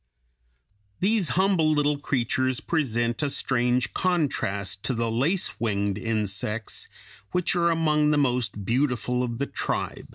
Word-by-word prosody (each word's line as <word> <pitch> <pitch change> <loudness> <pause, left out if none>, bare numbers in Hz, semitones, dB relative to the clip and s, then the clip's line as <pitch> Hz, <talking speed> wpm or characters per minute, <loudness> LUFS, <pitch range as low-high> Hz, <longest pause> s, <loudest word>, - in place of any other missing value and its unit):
These 200 -1 +2
humble 185 -5 +3
little 150 -1 +1
creatures 130 -1 0
present 120 -7 0
a 145 - +1
strange 125 -2 +1
contrast 100 - -1
to 130 - 0
the 115 0 -1
lace 150 +11 0
winged 100 -3 -1
insects 105 -1 -2 0.5
which 180 0 +1
are 170 -1 +3
among 155 -2 +2
the 150 - +3
most 125 -7 0
beautiful 125 0 0
of 120 -2 -2
the 140 - -1
tribe. - - -4
130 Hz, 130 wpm, -25 LUFS, 115-155 Hz, 0.5 s, humble